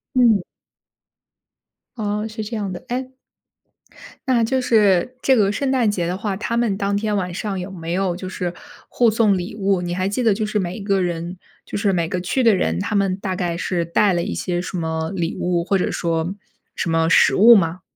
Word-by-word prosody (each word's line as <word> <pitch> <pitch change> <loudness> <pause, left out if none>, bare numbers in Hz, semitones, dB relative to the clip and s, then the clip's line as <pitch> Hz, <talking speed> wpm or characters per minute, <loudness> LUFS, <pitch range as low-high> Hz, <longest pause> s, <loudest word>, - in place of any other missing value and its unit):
嗯。 230 -6 +5 1.6
哦， 210 -1 -2
是 220 0 -6
这 225 +3 -5
样 200 -3 -3
的， 180 - -7
哎 255 +1 -3 1.2
那 245 -3 +3
就 260 +3 +1
是 215 -1 +3
这 265 - +4
个 205 -4 +3
圣 265 +5 -1
诞 245 -5 +2
节 180 -4 -1
的 180 - -2
话， 205 -1 -2
他 230 +2 -2
们 235 -4 +1
当 200 -1 -1
天 210 0 -1
晚 180 -2 -2
上 195 0 -3
有 185 +2 -6
没 165 -3 -6
有 185 -2 0
就 185 0 -6
是 180 -1 -3 0.3
互 240 -2 +3
送 215 -3 +3
礼 180 +3 -5
物， 195 -3 +1
你 175 0 -3
还 185 +1 -1
记 205 +6 -1
得 225 -4 +4
就 215 +2 -2
是 210 0 -1
每 180 -1 -3
一 - - -7
个 195 -1 +1
人 175 0 -3 0.3
就 - - -5
是 200 -1 +1
每 170 -3 0
个 180 +1 -2
去 255 +8 0
的 225 -4 +5
人， 80 - 0
他 210 - -2
们 195 -2 +1
大 190 -1 -3
概 175 -2 -2
是 175 -1 -1
带 195 +4 +2
了 175 - 0
一 - - -3
些 175 -1 -2
什 185 0 -5
么 160 0 -2
礼 170 -2 -2
物， 175 -1 0
或 195 +2 +1
者 - - -1
说 165 +2 -1 0.4
什 170 - -2
么 165 0 +2
食 - - +5
物 230 +4 +8
吗？ 175 -1 +1
195 Hz, 235 characters per minute, -21 LUFS, 175-215 Hz, 1.6 s, 物